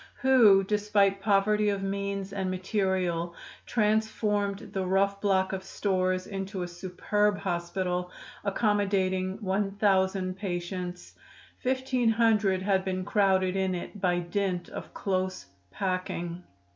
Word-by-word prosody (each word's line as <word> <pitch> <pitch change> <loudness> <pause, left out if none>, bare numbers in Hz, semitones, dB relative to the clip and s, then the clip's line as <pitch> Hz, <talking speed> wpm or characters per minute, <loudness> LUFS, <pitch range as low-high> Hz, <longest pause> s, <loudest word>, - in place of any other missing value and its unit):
who, 235 -7 +6
despite 205 -1 +2
poverty 210 +1 +3
of 200 -1 -1
means 200 0 -3
and 190 -2 -2
material, 185 -3 -1 0.3
transformed 210 -2 0
the 190 - -1
rough 195 +2 +1
block 190 -2 +2
of 190 -1 -3
stores 185 -1 0
into 195 -1 -4
a - - -4
superb 195 +4 0
hospital, 180 -1 -2 0.3
accommodating 195 -2 +1
1000 190 -1 +1
patients. 180 -1 -5 0.5
Fifteen 260 -2 +1
hundred 215 -4 +3
had 190 -1 +2
been 185 -1 -2
crowded 190 -2 +2
in 190 -1 0
it 185 +3 -7
by 180 -2 +2
dint 175 0 -2
of - - -8
close 185 -1 -2 0.2
packing. 180 - -3
195 Hz, 115 wpm, -28 LUFS, 185-205 Hz, 0.5 s, who